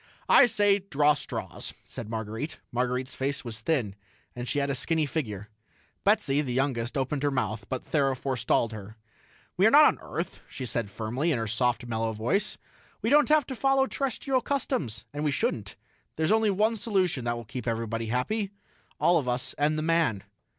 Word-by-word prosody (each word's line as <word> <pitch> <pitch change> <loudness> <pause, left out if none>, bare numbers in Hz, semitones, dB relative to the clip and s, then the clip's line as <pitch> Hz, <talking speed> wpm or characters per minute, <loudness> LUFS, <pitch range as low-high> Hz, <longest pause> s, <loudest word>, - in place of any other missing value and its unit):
"I 275 - +7
say, 205 -3 +3
draw 150 -6 +3
straws," - - -6
said 115 -5 -7
Marguerite. 110 +6 -4
Marguerite's 125 +2 -1
face 135 0 -2
was 110 -2 -5
thin, 120 -7 0 0.4
and 125 0 -5
she - - -1
had 140 0 +1
a - - 0
skinny 155 +4 +1
figure. 105 - -4 0.5
Betsy, 195 -9 +3
the 130 -4 -3
youngest, 130 -2 0
opened 135 +1 -1
her 145 - +2
mouth, 110 -5 -2
but 130 -2 -3
Thera 135 -4 +1
forestalled 125 -3 0
her. 110 0 -9 0.6
"We - - +6
are - - +7
not - - +8
on - - +3
Earth," - - -5
she 130 - -6
said 115 -3 -2
firmly, 115 +10 -1
in 140 - +1
her 115 - -2
soft, 120 +3 0
mellow 115 -1 -1
voice. 165 - 0 0.5
"We 225 - +1
don't 295 0 +5
have 305 -3 +5
to 260 - -5
follow 270 +1 +3
terrestrial 270 -1 -1
customs, 225 - -2
and 145 +1 -3
we 150 - +2
shouldn't. 110 -6 -1 0.4
There's 160 +3 +1
only 220 -1 +4
one 215 +3 +2
solution 190 - 0
that 120 0 0
will 120 - -7
keep 125 +3 -6
everybody 115 0 -2
happy 195 - -1 0.5
all 175 -1 +4
of 135 - -5
us 125 0 -2
and 150 +1 +2
the 155 - -1
man." 160 -11 +1
135 Hz, 185 wpm, -28 LUFS, 115-175 Hz, 0.6 s, not